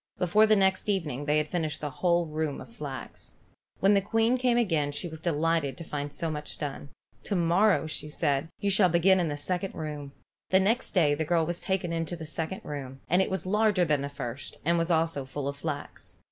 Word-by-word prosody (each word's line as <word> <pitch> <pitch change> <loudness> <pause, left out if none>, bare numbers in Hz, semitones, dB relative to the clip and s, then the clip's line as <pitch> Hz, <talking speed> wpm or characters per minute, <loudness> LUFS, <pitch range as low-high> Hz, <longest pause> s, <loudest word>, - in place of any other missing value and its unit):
Before 210 +5 +4
the 215 - +5
next 190 0 +2
evening 150 -9 -1
they 150 +1 +2
had 150 0 -1
finished 155 -3 -1
the 150 -1 -4
whole 170 +3 +2
roomful 155 -2 -3
of - - -17
flax. 140 - -7 0.5
When 195 +2 +5
the 200 - +4
Queen 225 +4 +2
came 245 -1 +3
again 165 -11 +1
she 160 +5 -3
was 160 -1 -9
delighted 165 -4 0
to - - -7
find 145 -2 -4
so 165 +2 -2
much 150 -1 -6
done. 140 -1 -5 0.4
"To 205 - -1
morrow," 180 +3 +3
said 150 -1 -1
she, 205 - -6
"you 200 - +3
shall 190 -2 +5
begin 180 +3 +4
in 175 - +1
the 145 - -3
second 180 +6 -3
room." 150 -3 -5 0.4
The 190 - +5
next 220 +6 +1
day 155 -5 +4
the 150 +2 -1
girl 165 +1 +2
was 175 +1 -3
taken 190 -3 -1
into 165 +1 -2
the 165 -2 -7
second 160 +3 -3
room, 135 -2 -6
and 180 +2 +5
it - - 0
was 190 -3 -2
larger 210 -2 +3
than 150 -3 +1
the 140 - -3
first 130 -2 -7
and 170 +1 +3
was 165 +1 0
also 165 -4 +1
full 135 +1 -5
of 140 0 -4
flax. 145 -1 -6
165 Hz, 220 wpm, -28 LUFS, 145-190 Hz, 0.5 s, the